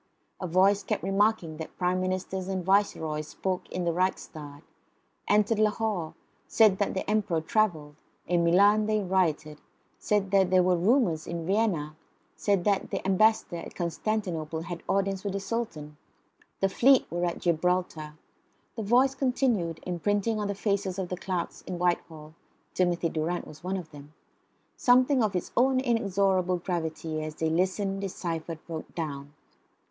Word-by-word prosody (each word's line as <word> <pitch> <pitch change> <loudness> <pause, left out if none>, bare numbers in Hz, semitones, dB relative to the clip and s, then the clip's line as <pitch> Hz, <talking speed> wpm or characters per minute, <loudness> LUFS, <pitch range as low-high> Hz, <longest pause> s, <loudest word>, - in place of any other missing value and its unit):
A 185 - -3
voice 190 +4 +4
kept 190 - -3
remarking 195 -4 +1
that 160 - -8
Prime 180 0 0
Ministers 185 0 -3
and 190 -2 -3
Viceroys 160 -6 +1
spoke 185 +2 -3
in 180 - -3
the 170 -1 0
Reichstag; 155 -5 -3 0.6
entered 210 +1 +3
Lahore; 210 -6 0 0.3
said 215 -4 +4
that 205 - 0
the 190 - -3
Emperor 210 -6 +1
travelled; 160 -4 0 0.3
in 175 -1 +1
Milan 205 +5 +4
they 215 0 +2
rioted; 170 -6 0 0.4
said 205 -2 0
there 185 -2 +4
were 180 0 +3
rumours 180 - +2
in 170 -1 -4
Vienna; 185 -7 0 0.4
said 200 -4 +1
that 200 -1 +1
the - - -4
Ambassador 195 -1 +2
at 165 - -9
Constantinople 170 -3 -2
had 170 0 -6
audience 195 -1 0
with 200 -2 -3
the 200 - -1
Sultan; 195 -8 -4 0.6
the 195 - +4
fleet 255 +7 +4
was 175 +1 -2
at 175 -1 -1
Gibraltar. 170 -2 -1 0.6
The 225 - -4
voice 250 +6 +3
continued, 245 - 0
imprinting 205 +5 0
on 205 - -1
the 200 - -2
faces 200 -2 -1
of 190 -2 -3
the 180 - -2
clerks 180 -1 -4
in 180 - -4
Whitehall 160 -3 -2 0.4
(Timothy 175 -2 +1
Durrant 165 +3 -2
was 155 +1 -13
one 190 +2 -2
of 170 -4 -8
them) 145 +1 -13 0.6
something 255 +1 +4
of 210 -3 0
its 180 - -3
own 260 +1 +3
inexorable 195 -6 +1
gravity, 160 -3 -3
as 155 0 -6
they 160 0 -1
listened, 195 +3 0
deciphered, 165 -4 -4
wrote 160 -2 -7
down. 145 -3 -5
185 Hz, 150 wpm, -28 LUFS, 165-205 Hz, 0.6 s, voice